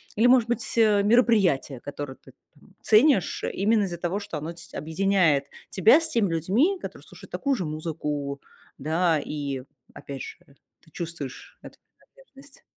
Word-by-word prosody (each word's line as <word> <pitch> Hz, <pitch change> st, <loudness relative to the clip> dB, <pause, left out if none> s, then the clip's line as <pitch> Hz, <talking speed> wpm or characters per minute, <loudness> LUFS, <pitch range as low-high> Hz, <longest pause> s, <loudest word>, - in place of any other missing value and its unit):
Или, 225 Hz, -, +3 dB
может 245 Hz, -2 st, +4 dB
быть, 240 Hz, -1 st, -2 dB
мероприятия, 210 Hz, -, +3 dB
которые 145 Hz, 0 st, -7 dB
ты -, -, -18 dB, 0.2 s
там -, -, -23 dB
ценишь 220 Hz, -, +3 dB
именно 210 Hz, +2 st, +2 dB
из-за 175 Hz, -3 st, -4 dB
того, 175 Hz, +3 st, -2 dB
что 200 Hz, -6 st, -6 dB
оно 155 Hz, +3 st, -5 dB
ть 165 Hz, -1 st, -15 dB
объединяет 160 Hz, -2 st, +1 dB, 0.2 s
тебя 220 Hz, -, +5 dB
с 325 Hz, -, -3 dB
теми 225 Hz, -, +1 dB
людьми, 225 Hz, -, +1 dB
которые -, -, -8 dB
слушают -, -, -14 dB
такую 280 Hz, -1 st, 0 dB
же 185 Hz, -, -3 dB
музыку, 150 Hz, -3 st, -4 dB, 0.4 s
да, 160 Hz, +3 st, +1 dB
и 140 Hz, -3 st, -4 dB, 0.3 s
опять 135 Hz, -2 st, -8 dB
же, -, -, -9 dB, 0.4 s
ты -, -, -23 dB
чувствуешь 165 Hz, -6 st, -7 dB
эту -, -, -13 dB, 0.2 s
принадлежность. 285 Hz, -, -20 dB
180 Hz, 150 wpm, -25 LUFS, 150-225 Hz, 0.4 s, тебя